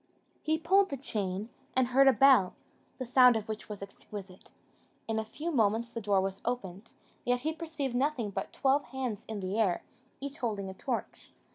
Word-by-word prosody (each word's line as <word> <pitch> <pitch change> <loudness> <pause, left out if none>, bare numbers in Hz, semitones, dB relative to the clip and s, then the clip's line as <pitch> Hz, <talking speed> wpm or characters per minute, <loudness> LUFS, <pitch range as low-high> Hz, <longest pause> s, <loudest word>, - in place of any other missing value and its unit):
He 315 0 +1
pulled 385 +5 +3
the 275 - -3
chain, 205 -5 -3 0.3
and 260 -1 +3
heard 270 +2 +5
a - - +9
bell, 255 -6 +5 0.4
the 255 - -4
sound 250 0 +6
of 220 -1 -2
which 220 0 -6
was 205 -2 -6
exquisite. 195 -1 -10 0.6
In 220 -1 0
a - - -1
few 300 +10 -5
moments 230 -2 +2
the 230 - -5
door 200 -2 +2
was 195 0 -3
opened; 205 -4 -4 0.3
yet 245 0 +1
he 315 +4 -1
perceived 315 -5 -4
nothing 250 -4 0
but - - -4
twelve 275 +1 +2
hands 250 -5 -4
in 215 -2 -4
the 190 +4 -2
air, 190 -6 +2 0.4
each 280 +2 -6
holding 205 -6 -2
a - - -9
torch. 235 +4 -4
235 Hz, 185 wpm, -31 LUFS, 205-270 Hz, 0.6 s, a